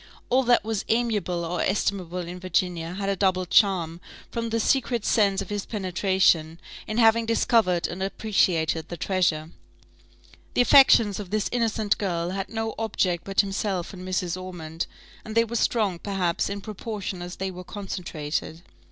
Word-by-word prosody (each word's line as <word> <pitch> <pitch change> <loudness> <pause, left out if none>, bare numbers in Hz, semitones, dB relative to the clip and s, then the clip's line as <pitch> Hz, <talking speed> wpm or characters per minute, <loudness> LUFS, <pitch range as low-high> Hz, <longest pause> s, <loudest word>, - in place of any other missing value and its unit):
All 260 +2 +5
that 240 0 +4
was 220 -2 -2
amiable 210 -7 0
or 175 +1 -2
estimable 190 -3 -1
in 180 +1 -7
Virginia 180 -1 -1
had 195 0 -3
a 200 - +1
double 185 -1 +1
charm, 175 -3 +2 0.3
from 230 0 -3
the 230 +1 0
secret 240 -1 +1
sense 200 -4 +2
of - - -11
his 205 -1 -2
penetration, 185 -5 +1 0.3
in 215 - -3
having 225 0 +4
discovered 220 -6 +2
and 180 +2 -6
appreciated 180 -5 0
the 175 - -5
treasure. 165 -4 0 1.0
The - - +5
affections 240 -6 +6
of 200 -3 -7
this 215 0 0
innocent 220 -3 0
girl 175 -3 -1
had 195 0 -4
no 225 0 -3
object 185 -6 0
but 195 0 +3
himself 195 -2 -3
and 185 - -9
Mrs. 185 -1 -2
Ormond, 165 -3 -5 0.4
and 220 - -8
they 230 - +5
were 230 +1 -6
strong, 210 -6 +1
perhaps, 185 -4 -1
in 200 0 -4
proportion 205 -3 -5
as 175 +1 -6
they 190 0 -3
were 180 0 -9
concentrated. 170 -5 -5
195 Hz, 160 wpm, -25 LUFS, 175-215 Hz, 1.0 s, affections